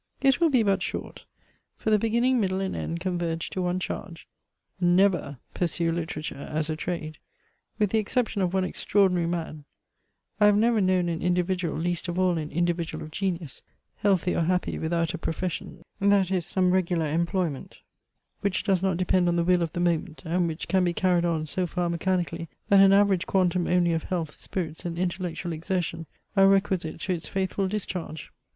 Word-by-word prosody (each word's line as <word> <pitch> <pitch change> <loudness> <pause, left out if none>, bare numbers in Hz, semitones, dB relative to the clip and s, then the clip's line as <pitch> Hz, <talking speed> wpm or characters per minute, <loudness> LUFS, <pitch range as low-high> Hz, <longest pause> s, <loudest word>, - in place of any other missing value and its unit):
It 270 -1 +3
will 335 - +5
be 255 -5 +3
but 195 -3 +2
short; - - -5 0.5
for 220 - -2
the 215 - +5
beginning, 235 +4 +2
middle, 190 -3 0
and 195 -1 -2
end 170 - -3
converge 175 -2 -2
to 185 - -2
one 180 0 0
charge: 180 -2 -6 0.5
never 175 -5 +2 0.2
pursue 170 -1 0
literature 155 -4 -4
as 155 +1 -1
a - - -1
trade. 155 -1 -4 0.6
With 210 -3 +1
the 220 - +3
exception 220 -1 -1
of 180 -2 +1
one 190 0 +1
extraordinary 185 -2 +1
man, 165 -3 -4 0.8
I 210 - +6
have 205 0 +5
never 225 0 +3
known 185 -2 +2
an 165 -1 -2
individual, 180 -1 0
least 175 +1 -2
of 175 0 -3
all 180 -2 +2
an 155 -1 -4
individual 175 0 -1
of 155 - -9
genius, 175 -6 -3 0.4
healthy 190 -3 +2
or - - +1
happy 180 +2 0
without 165 0 0
a 175 - -4
profession, 170 +1 -4 0.2
that 200 -2 +3
is, 180 -3 0
some 185 0 +2
regular 175 -3 +1
employment, 170 -1 -2 0.6
which 200 -2 -1
does 190 -3 +2
not 190 -3 +1
depend 185 0 +2
on 175 - +2
the 170 - +2
will 180 0 +3
of 165 -2 -2
the 175 - -3
moment, 170 -1 -1
and 175 +1 +1
which 160 0 -4
can 190 -1 +2
be 175 -1 +1
carried 175 -1 +2
on 160 -2 0
so 180 +4 -1
far 175 0 -1
mechanically 170 -1 -1 0.2
that 200 - +7
an 195 0 +7
average 195 -2 +3
quantum 180 -2 +2
only 175 -1 +3
of 160 - -2
health, 165 -4 -3
spirits, 165 -4 -5
and 170 -2 -4
intellectual 175 -1 -2
exertion 165 0 -3 0.3
are 195 -1 +6
requisite 195 -5 +1
to 185 - -1
its 170 -2 -5
faithful 190 0 -1
discharge. 185 -6 -4
180 Hz, 185 wpm, -26 LUFS, 170-190 Hz, 0.8 s, that